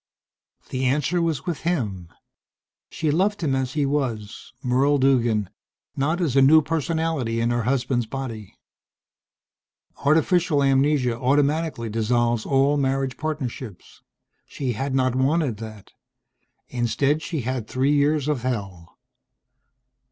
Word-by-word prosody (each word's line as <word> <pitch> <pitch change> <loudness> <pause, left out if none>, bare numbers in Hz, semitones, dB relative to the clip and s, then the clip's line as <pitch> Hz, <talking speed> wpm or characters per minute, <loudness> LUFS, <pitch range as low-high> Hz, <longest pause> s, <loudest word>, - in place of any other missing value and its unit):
The 130 0 -2
answer 150 +6 +1
was 160 -5 -1
with 175 -4 -3
him. 105 - -2 0.8
She 155 -2 -1
loved 195 +6 +1
him 140 -4 +1
as 130 -1 -1
he 150 -2 +1
was, 125 -7 -3
Merle 135 +3 +2
Duggan 120 -7 +2 0.4
not 155 +6 0
as 155 -8 0
a 135 - +6
new 155 +4 +6
personality 160 -6 -1
in 115 +1 +1
her 120 0 0
husband's 125 -2 0
body. 115 -6 -6 1.4
Artificial 155 0 +2
amnesia 135 -2 +2
automatically 140 -1 +1
dissolves 115 +1 0
all 140 +2 +3
marriage 135 -2 0
partnerships. 130 - -6 0.5
She 135 -3 -3
had 135 +4 -2
not 130 -2 +2
wanted 135 -2 +1
that. 110 -2 -10 0.8
Instead 130 +5 0
she 155 -2 -3
had 125 -2 -3
three 135 +5 +1
years 145 0 +2
of 150 -5 0
hell.... 100 -9 -5
135 Hz, 120 wpm, -23 LUFS, 120-150 Hz, 1.4 s, a